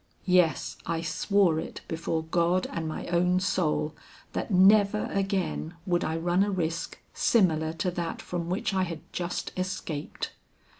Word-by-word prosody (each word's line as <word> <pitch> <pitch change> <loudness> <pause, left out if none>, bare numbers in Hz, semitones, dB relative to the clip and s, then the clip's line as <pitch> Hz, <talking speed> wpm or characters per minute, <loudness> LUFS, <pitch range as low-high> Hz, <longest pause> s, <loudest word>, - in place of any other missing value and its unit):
Yes, 180 -3 +2
I 165 -1 -1
swore 175 0 +2
it - - -6
before 160 0 -2
God 170 +2 +1
and 165 -1 -3
my 155 - -4
own 180 +1 +3
soul, 155 -4 0 0.4
that - - -2
never 200 +2 +5
again 190 -4 -1
would 175 -1 +1
I 160 +1 -1
run 175 +3 +2
a 205 - +2
risk 170 -4 -2 0.2
similar 160 -8 +3
to 180 +2 -1
that 170 -1 -3
from 170 -1 -4
which 185 +2 -1
I 190 - +2
had 170 -4 -3
just 175 -1 -3
escaped. 185 -5 -4
175 Hz, 150 wpm, -28 LUFS, 165-185 Hz, 0.4 s, never